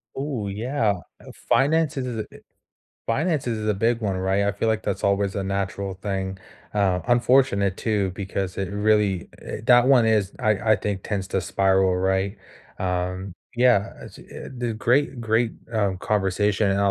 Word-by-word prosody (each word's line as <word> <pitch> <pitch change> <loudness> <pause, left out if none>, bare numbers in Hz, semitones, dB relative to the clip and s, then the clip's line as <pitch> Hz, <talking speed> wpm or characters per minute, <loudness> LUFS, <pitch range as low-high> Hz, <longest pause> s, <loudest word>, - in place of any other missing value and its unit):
Ooh, 135 -7 -3
yeah. 110 +2 0 0.3
Uh, - - -12 0.2
finance 155 +2 +3
is 130 - -1
is 115 -3 -4
a - - -3 0.8
finance 150 +4 0
is 115 -2 -1
is 110 0 -3
a 105 - +2
big 115 +4 +1
one, 100 -4 -1
right? 95 +2 +1
I 100 - +1
feel 100 +3 -1
like 110 -1 0
that's 95 - -3
always 100 0 +1
a 100 - -2
natural 100 0 -3
thing. 95 -1 -4 0.4
Uh, 95 -3 +2
unfortunate 120 -5 +3
too 105 -4 0
because 95 -1 -4
it 95 -1 -3
really 105 -3 +1
i - - -6
that 120 0 +6
one 125 -4 +5
is 105 -3 +2
I 110 -2 +2
I - - +4
think, 100 -2 -3
tends 100 -3 -3
to 95 - 0
spiral, 95 +1 +2
right? 95 +2 0 0.4
Um 90 +1 -2 0.2
yeah, 120 -4 +3
as - - -11
it - - -16
and 125 -2 -9
the 120 -1 -1
great, 120 +4 +1
great, 115 0 +1 0.2
um, 100 -4 0
conversation, 105 +1 +1
and 100 +1 +1
a 100 - +3
100 Hz, 180 wpm, -24 LUFS, 95-115 Hz, 0.8 s, that